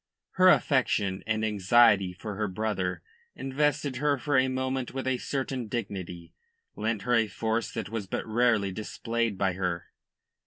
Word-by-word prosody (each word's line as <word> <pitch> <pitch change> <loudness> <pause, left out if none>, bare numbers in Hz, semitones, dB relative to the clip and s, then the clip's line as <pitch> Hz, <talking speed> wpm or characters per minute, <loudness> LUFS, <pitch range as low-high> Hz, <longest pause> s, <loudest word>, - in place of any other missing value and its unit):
Her 185 0 +5
affection 100 - +2
and 110 0 0
anxiety 100 -1 +4
for 100 +4 -7
her 105 +1 -2
brother 95 -2 -2 0.3
invested 145 0 -1
her 145 +1 +1
for 145 +3 -1
a 130 0 +4
moment 130 0 -2
with 135 - -3
a 130 -1 0
certain 135 -3 -3
dignity, 95 -6 -5 0.4
lent 110 -2 -2
her 125 - 0
a 115 -2 +4
force 110 +3 -2
that - - -4
was 110 -3 -4
but - - -3
rarely 110 -3 +2
displayed 115 +2 -2
by 95 -2 +1
her. 90 -2 -3
110 Hz, 155 wpm, -28 LUFS, 100-130 Hz, 0.4 s, Her